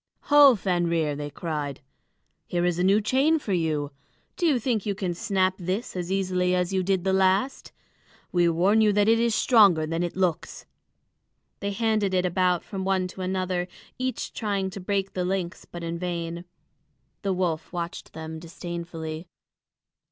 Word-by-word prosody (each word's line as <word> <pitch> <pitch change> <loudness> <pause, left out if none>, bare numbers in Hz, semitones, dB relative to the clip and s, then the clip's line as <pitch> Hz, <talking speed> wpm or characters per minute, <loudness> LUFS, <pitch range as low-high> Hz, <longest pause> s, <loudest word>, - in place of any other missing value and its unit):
"Ho, 285 -3 +9
Fenrir!" 170 -6 0
they 145 0 -5
cried. 145 -2 -4 0.7
"Here 175 0 0
is 175 -1 0
a - - +2
new 200 +3 +4
chain 270 +9 +3
for 220 -10 -3
you. 155 -4 0 0.4
Do 345 - +1
you 290 -5 +3
think 230 -3 -1
you 200 -2 -2
can 185 -3 -2
snap 190 -1 +1
this 190 +6 -3
as 180 0 -3
easily 185 -1 +1
as 180 +1 0
you 190 - +2
did 190 -1 0
the 190 0 +1
last? 190 +7 +1 0.6
We 175 -1 +3
warn 190 +7 +3
you 215 -1 +5
that 205 0 +3
it 225 +1 +5
is 230 -1 +2
stronger 200 -12 +5
than 165 +2 -2
it 175 -1 -2
looks." 180 -3 -1 0.9
They 200 - -2
handed 210 -2 0
it 180 0 +2
about 180 -1 +1
from 195 -1 -5
one 190 -1 +1
to 190 - -9
another, 185 -1 -1 0.3
each 255 0 -3
trying 200 -3 -2
to 195 - -7
break 195 +1 -2
the 180 - -1
links, 180 -1 -3
but 175 -1 -9
in 170 0 -4
vain. 170 -1 -4 0.8
The 195 - -1
wolf 170 -4 -2
watched 170 -1 -5
them 160 0 -7
disdainfully. 170 -1 -6
185 Hz, 170 wpm, -26 LUFS, 170-200 Hz, 0.9 s, Ho